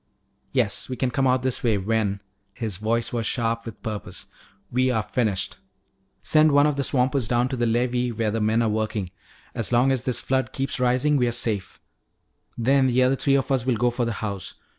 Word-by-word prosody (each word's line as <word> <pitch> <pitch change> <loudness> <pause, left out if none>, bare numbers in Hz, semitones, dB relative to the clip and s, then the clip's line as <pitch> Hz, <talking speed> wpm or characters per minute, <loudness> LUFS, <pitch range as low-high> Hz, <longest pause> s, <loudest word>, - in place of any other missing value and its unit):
"Yes, - - 0
we 130 - -3
can 125 +1 -1
come 135 +1 +1
out 130 0 +2
this 130 -2 -1
way 115 -4 +2
when" 100 0 -1 0.3
his 110 -6 -3
voice 115 +3 -1
was 115 -2 -1
sharp 115 -1 -1
with 115 - -10
purpose 105 -2 -6 0.5
"we 130 +1 +2
are 110 -4 0
finished. 105 -5 -1 0.7
Send 155 +9 +4
one 145 0 +5
of 150 -1 +1
these 140 -1 -1
swampers 130 -2 +1
down 120 +2 +1
to 130 - -2
the 120 -1 0
levee 120 +1 0
where 110 -1 -1
the 115 +1 -2
men 110 +2 +2
are 115 - +1
working. 105 -3 -2 0.4
As 115 - -2
long 125 +3 +4
as 130 -3 0
this 125 0 0
flood 130 0 -1
keeps 135 0 -3
rising 125 +4 +2
we're 125 -2 +2
safe. 110 -5 -1 0.8
Then 130 +3 +3
the 130 0 +3
other 130 +1 +3
three 140 +1 +2
of 135 0 0
us 130 -3 +2
will 125 -1 +1
go 120 +2 +2
for 120 0 -1
the 115 - -2
house. 100 -3 -5
120 Hz, 205 wpm, -24 LUFS, 110-130 Hz, 0.8 s, one